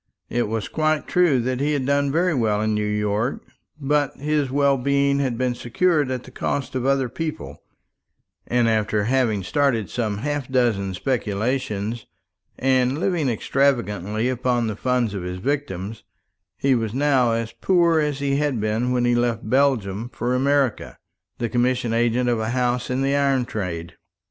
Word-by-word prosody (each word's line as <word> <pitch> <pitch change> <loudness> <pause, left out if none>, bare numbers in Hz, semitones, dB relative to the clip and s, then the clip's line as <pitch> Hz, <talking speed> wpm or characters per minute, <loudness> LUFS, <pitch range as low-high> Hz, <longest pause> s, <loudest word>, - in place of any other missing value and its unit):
It 120 -2 0
was 110 0 -3
quite 155 -1 0
true 175 -7 +3
that 130 +1 -2
he 145 +2 +1
had 140 -3 -1
done 140 0 +1
very 175 +3 +2
well 110 -6 +1
in 110 0 0
New 105 0 0
York; 105 +4 -1 0.4
but 145 0 0
his 150 -1 0
well 140 +1 +3
being 140 +1 +2
had 130 -4 -1
been 125 0 0
secured 145 +5 +1
at 130 -1 -3
the 130 - -13
cost 135 +1 -3
of 130 0 -1
other 135 -1 +2
people; 120 - -6 0.9
and 120 -1 +2
after 110 -1 +1
having 115 -4 +1
started 120 0 0
some 110 -4 -2
half 145 +2 -3
dozen 110 -7 +1
speculations, 115 -1 -2 0.5
and 130 0 +2
living 170 -5 0
extravagantly 115 -4 0
upon 125 -1 0
the 110 -2 -2
funds 125 -2 0
of 100 - -4
his 90 +1 -5
victims, 110 -4 -3 0.5
he 135 -1 +2
was 115 -2 -1
now 135 -4 +3
as 115 -1 -2
poor 170 -3 +3
as 150 -2 0
he 140 0 0
had 145 -5 0
been 110 +4 0
when 125 -1 +1
he 120 - +3
left 120 -2 0
Belgium 120 -6 +1
for 120 +1 -2
America, 135 -2 0 0.4
the 120 - -1
commission 120 0 0
agent 120 +1 +1
of 120 -2 +1
a 110 0 -2
house 125 0 0
in 130 +1 0
the 140 +1 +1
iron 135 -3 +2
trade. 85 -6 -5
125 Hz, 170 wpm, -23 LUFS, 110-140 Hz, 0.9 s, true